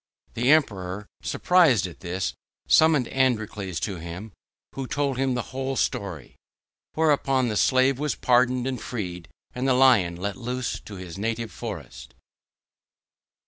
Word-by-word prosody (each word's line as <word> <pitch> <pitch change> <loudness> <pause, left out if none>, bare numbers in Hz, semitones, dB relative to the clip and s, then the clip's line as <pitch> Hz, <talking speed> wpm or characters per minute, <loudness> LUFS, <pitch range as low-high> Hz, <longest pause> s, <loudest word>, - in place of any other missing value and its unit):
The 120 +3 0
Emperor, 100 -10 +2 0.2
surprised 165 - +3
at 90 - -8
this, 90 +1 -3 0.3
summoned 155 -6 +5
Androcles 110 -8 0
to 100 -1 -3
him, 85 +6 -8 0.4
who 135 -1 -5
told 140 -2 -1
him 135 -2 +1
the 125 - -4
whole 135 0 -2
story. - - -3 0.6
Whereupon 140 -5 +2
the 105 - -2
slave 130 +4 +3
was 150 -1 -1
pardoned 125 0 +2
and 130 -3 -3
freed, 90 -8 -5 0.3
and 125 +2 -2
the 130 - +4
Lion 120 -10 +5
let 100 +3 -4
loose 125 +1 -3
to 105 - -9
his 90 -1 -8
native 115 +1 -2
forest. 70 - -8
120 Hz, 140 wpm, -25 LUFS, 95-130 Hz, 0.6 s, summoned